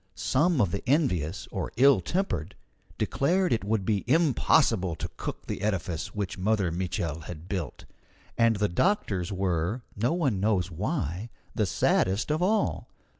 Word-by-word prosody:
Some 150 +4 +2
of 100 -7 +2
the 100 - -2
envious 95 - +1
or - - -3
ill 135 +2 +6
tempered 105 - -2 0.4
declared 180 +4 +1
it 115 - -1
would 105 -1 0
be 105 -2 +1
impossible 125 - +3
to - - -6
cook - - -6
the - - -4
edifice 90 -5 -2
which 100 -2 -3
Mother 100 -2 +1
Mitchel 85 -3 -3
had 85 -1 -8
built; 95 -6 -4 0.5
and 115 -1 +3
the 105 0 +1
doctors 95 - 0
were, 95 +4 -1
no 115 +5 +1
one 140 - 0
knows 95 -3 +1
why, 90 +5 -3 0.2
the - - 0
saddest 100 +9 +1
of 155 +3 0
all. 210 +4 +1
100 Hz, 150 wpm, -27 LUFS, 90-135 Hz, 0.5 s, ill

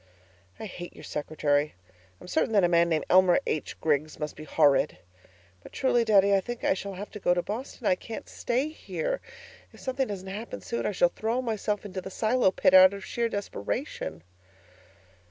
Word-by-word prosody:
I - - -5
hate 175 -3 -8
your - - -12
secretary. 150 -1 -1 0.4
I - - -14
am - - -11
certain 225 +2 0
that 200 -3 +5
a - - +5
man 170 0 +3
named 160 -2 0
Elmer 185 -1 +5
H. 155 - -3
Griggs 155 0 0
must 150 -1 -4
be 155 - -9
horrid. 145 0 +3 0.6
But - - -14
truly, 245 -3 +2
Daddy, 200 -3 +4
I 195 - +4
think 240 +4 -6
I - - +3
shall 195 0 -6
have 205 +3 -7
to 210 - -8
go 175 -2 +2
to 175 - 0
Boston. 235 +3 -6
I - - +5
can't 220 +5 -7
stay 255 +5 -1
here. - - -4 0.5
If - - -16
something 260 0 -1
doesn't 195 -2 -6
happen 195 - -6
soon, 115 +4 -3
I - - 0
shall 175 -3 +3
throw 225 +3 -1
myself 215 -4 -2
into 190 -2 -5
the 190 - -7
silo 220 +3 +2
pit 185 - +2
out 185 +1 +8
of 200 -1 -8
sheer 235 +3 -1
desperation. 200 - -4
195 Hz, 195 wpm, -27 LUFS, 170-225 Hz, 0.6 s, out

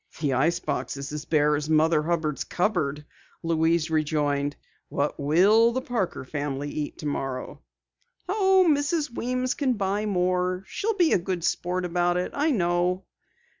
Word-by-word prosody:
"The 145 -4 0
ice 165 +7 +2
box 140 - -3
is 140 +1 -6
as 150 +1 -5
bare 150 -2 +3
as 150 +1 -3
Mother 155 0 +3
Hubbard's 160 -2 -1
cupboard," 155 -7 -1 0.4
Louise 165 0 +1
rejoined. 145 -2 0 0.3
"What 145 +1 -2
will 195 +11 +4
the 260 - -1
Parker 230 - -3
family 145 0 -4
eat 150 -1 -4
tomorrow?" 135 -3 -4 0.7
"Oh, 380 -1 +4
Mrs. 295 -1 +1
Weems 255 +2 -1
can 270 -4 0
buy 205 0 -1
more. 180 -1 0
She'll 440 - -2
be 350 -4 +4
a - - +4
good 175 -1 -3
sport 180 +1 -1
about 175 0 +1
it, 180 - -2
I 295 +3 +1
know." 180 - +1
175 Hz, 150 wpm, -26 LUFS, 150-210 Hz, 0.7 s, will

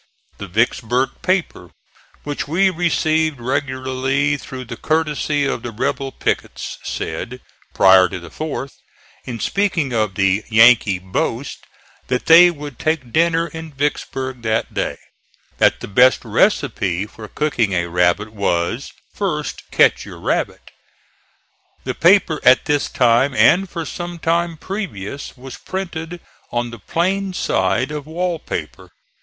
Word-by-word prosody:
The 100 - -6
Vicksburg 120 +5 +1
paper, 185 - -1 0.5
which 145 0 -4
we 190 +6 +3
received 160 -4 +1
regularly 130 +2 -1
through 130 -2 -8
the 120 - -7
courtesy 150 -2 0
of 135 - -2
the 120 - -5
rebel 135 +4 -2
pickets, - - -3
said 120 +10 -5 0.4
prior 95 -1 +6
to 90 - -5
the 85 -1 -12
fourth, 145 -3 -5 0.5
in 120 -2 -5
speaking 180 - 0
of 110 -4 0
the 95 +1 +2
"Yankee" 110 -3 +5
boast 95 +8 -3 0.4
that 125 -1 -1
they 170 +2 +8
would 145 -6 -8
take 155 -7 -1
dinner 165 0 +3
in 160 0 -8
Vicksburg 135 -2 -3
that 110 0 -1
day, - - -2 0.6
that - - +3
the - - -6
best 125 +6 +4
receipt 95 +3 +1
for 110 -1 -10
cooking 120 -7 0
a 85 -1 +1
rabbit 90 +5 +1
was 85 -5 -1 0.2
"First - - -3
ketch - - +4
your - - -10
rabbit." - - -2 1.1
The - - -3
paper 175 -3 +4
at 130 0 +5
this 145 -1 0
time 125 +2 +3
and 190 +6 +4
for 165 -1 -5
some 175 +2 -6
time 170 0 0
previous 145 - -6
was 130 +1 -9
printed 175 -3 -5 0.3
on 120 0 -2
the 115 - -9
plain 190 - -1
side 120 - 0
of 150 -1 -6
wall 170 +1 -2
paper. - - -6
135 Hz, 135 wpm, -19 LUFS, 115-160 Hz, 1.1 s, they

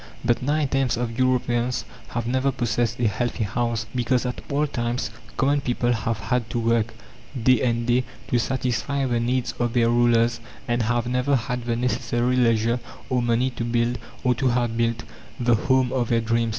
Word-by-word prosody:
But 120 -1 +2
nine 145 +3 +1
tenths 135 -3 +1
of 120 0 -3
Europeans 125 -1 +1 0.2
have 120 -1 -3
never 130 +3 +1
possessed 120 -1 -1
a 120 - +3
healthy 120 +2 -1
house, 115 +1 -1
because 125 0 +1
at 125 - -3
all 145 +1 +1
times 120 -4 -2 0.3
common 140 +1 +2
people 120 -1 0
have 115 -1 -1
had 110 +3 -1
to 120 - -1
work 115 -1 +1 0.5
day 130 -1 +5
after 120 -2 +1
day 125 +1 +2 0.3
to 120 - +2
satisfy 130 +3 -1
the 120 -2 +1
needs 125 +1 0
of 120 -1 0
their 115 -1 +3
rulers, 120 0 +3 0.3
and 120 0 +1
have 120 +1 0
never 125 +3 +1
had 125 0 -2
the 120 -1 0
necessary 120 +1 0
leisure 115 -1 +2 0.3
or 125 -1 +2
money 120 +2 +1
to 120 - -4
build, 120 +1 0 0.2
or 125 -1 +3
to 130 +2 0
have 120 -2 +1
built, 115 0 0 0.4
the 120 -1 +3
home 130 +3 +2
of 125 -3 0
their 115 - +3
dreams. 115 0 +1
120 Hz, 185 wpm, -24 LUFS, 115-125 Hz, 0.5 s, day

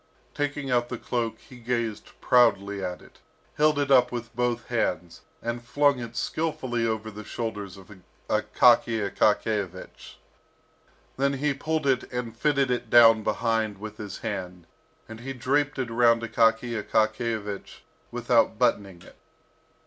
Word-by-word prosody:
Taking 145 -2 -3
out 120 -1 +1
the - - -4
cloak, 115 -2 -3
he 125 - -15
gazed 115 -2 -4
proudly 100 -5 +3
at 90 -1 -5
it, - - -20 0.4
held 150 0 +3
it 140 -1 0
up 125 -2 +5
with 120 -1 -6
both 120 -1 -1
hands, 90 -8 -2 0.2
and 120 0 -3
flung 140 +2 +2
it 120 -1 -7
skilfully 130 -7 -2
over 110 0 -3
the 105 +1 -9
shoulders 105 -3 -5
of 95 +1 -15 0.4
Akaky 115 -3 +3
Akakiyevich. 105 -4 -1 1.0
Then 140 +1 +1
he 140 +1 0
pulled 155 +2 -2
it 130 -2 0
and 125 -2 -4
fitted 140 0 +1
it 120 -2 -2
down 115 -1 +7
behind 110 -1 -1
with 110 +1 -8
his 105 -3 -7
hand, 90 -5 -5 0.4
and 110 0 -10
he 135 +3 -6
draped 145 +4 0
it 125 -3 -3
around 115 0 +3
Akaky 115 +1 +2
Akakiyevich 110 -2 -2 0.3
without - - +1
buttoning 95 -3 0
it. - - -17
115 Hz, 140 wpm, -26 LUFS, 110-125 Hz, 1.0 s, down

